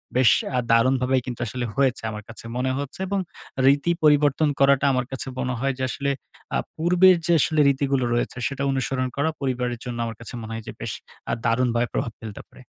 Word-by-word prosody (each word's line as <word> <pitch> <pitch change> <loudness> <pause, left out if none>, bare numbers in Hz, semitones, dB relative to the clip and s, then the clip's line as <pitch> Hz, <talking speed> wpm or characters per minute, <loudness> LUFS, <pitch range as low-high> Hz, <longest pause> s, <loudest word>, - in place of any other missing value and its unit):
বেশ 125 -1 +6 0.3
আ - - +3
দারুণভাবে 125 +2 +3
কিন্তু 125 -2 -5
আসলে 120 +3 -3
হয়েছে 135 -4 +1
আমার 105 0 -7
কাছে 115 - -9
মনে 130 +1 0
হচ্ছে 140 +2 -5
এবং 200 +1 0 0.5
রীতি 140 +5 +4
পরিবর্তন 150 0 +4
করাটা 140 0 +4
আমার 125 -1 0
কাছে 135 - -3
মনে 125 0 -1
হয় 135 +2 0
যে 130 - -3
আসলে 140 +3 -1 0.4
আ - - +3 0.2
পূর্বের 180 +3 +5
যে 170 - +3
আসলে 155 +2 +2
রীতিগুলো 135 -1 +1
রয়েছে, 120 +1 -1
সেটা 140 0 -4
অনুসরণ 130 -1 -1
করা 140 +3 +1
পরিবারের 125 -3 -1
জন্য 120 -1 -4
আমার 115 -1 -5
কাছে 115 +2 -8
মনে 110 0 -7
হয়, 115 0 -5
যে - - -4
বেশ - - -4 0.4
আ - - +1
দারুণভাবে 120 0 +2
প্রভাব 115 - -1
ফেলতে 110 -3 -8
পারে। - - -16
130 Hz, 195 wpm, -24 LUFS, 120-140 Hz, 0.5 s, বেশ